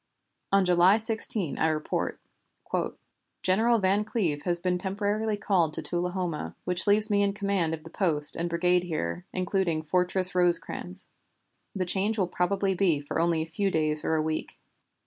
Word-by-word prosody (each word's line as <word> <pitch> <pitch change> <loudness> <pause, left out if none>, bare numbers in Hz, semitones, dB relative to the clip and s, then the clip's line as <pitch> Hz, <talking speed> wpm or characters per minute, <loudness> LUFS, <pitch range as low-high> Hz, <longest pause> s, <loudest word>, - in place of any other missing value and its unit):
On 195 -1 +4
July 180 +3 +5
16 220 -6 -2
I 160 - +3
report: 155 -1 -2 1.2
"General 225 +6 +3
Van 200 0 +1
Cleve 185 -10 -1
has 175 -1 +2
been 180 +1 0
called 180 - -2
temporarily 205 +3 -1
to 180 -6 +1
Tullahoma, 175 - -2
which 180 +2 +1
leaves 210 +1 +4
me 205 0 +3
in 200 0 +1
command 195 -5 -1
of 155 - -16
the 165 - -12
post 155 -7 +1
and 170 +1 -2
brigade 180 +1 +1
here, 85 - -4
including 185 -3 -1
Fortress 180 +3 +1
Rosecrans. 165 - -1 0.7
The 185 -2 -1
change 200 +5 +1
will 190 -3 +1
probably 190 +2 0
be 170 -6 +1
only 165 -1 +1
for - - -16
a - - -16
few 200 +4 0
days 155 -3 +2
or 160 - 0
a 155 - +1
week. 155 0 -4
180 Hz, 165 wpm, -27 LUFS, 165-200 Hz, 1.2 s, July